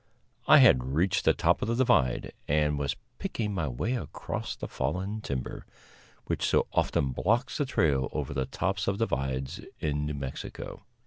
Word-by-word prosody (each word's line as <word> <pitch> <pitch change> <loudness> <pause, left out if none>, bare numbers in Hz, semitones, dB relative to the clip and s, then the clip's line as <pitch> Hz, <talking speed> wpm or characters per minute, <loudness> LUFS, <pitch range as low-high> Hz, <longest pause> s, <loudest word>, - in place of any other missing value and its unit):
I - - +9
had 65 +2 +5
reached 95 +4 +2
the - - +6
top - - +2
of - - -1
the 115 - +1
divide, 120 - +2
and 75 0 +2
was 70 0 -1 0.2
picking 115 - -2
my 85 -6 -1
way 65 - -2
across 125 - -4
the - - -6
fallen 100 +4 -2
timber, 65 -9 -4 0.6
which - - -2
so - - +3
often 65 -2 +1
blocks 115 - 0
the 145 - +1
trail 70 - +2
over 70 -2 -3
the 65 -1 -1
tops 95 0 -1
of 100 - +1
divides 65 - -2 0.2
in 75 -1 -1
New 75 - -3
Mexico. 70 -2 -6
75 Hz, 170 wpm, -29 LUFS, 70-105 Hz, 0.6 s, I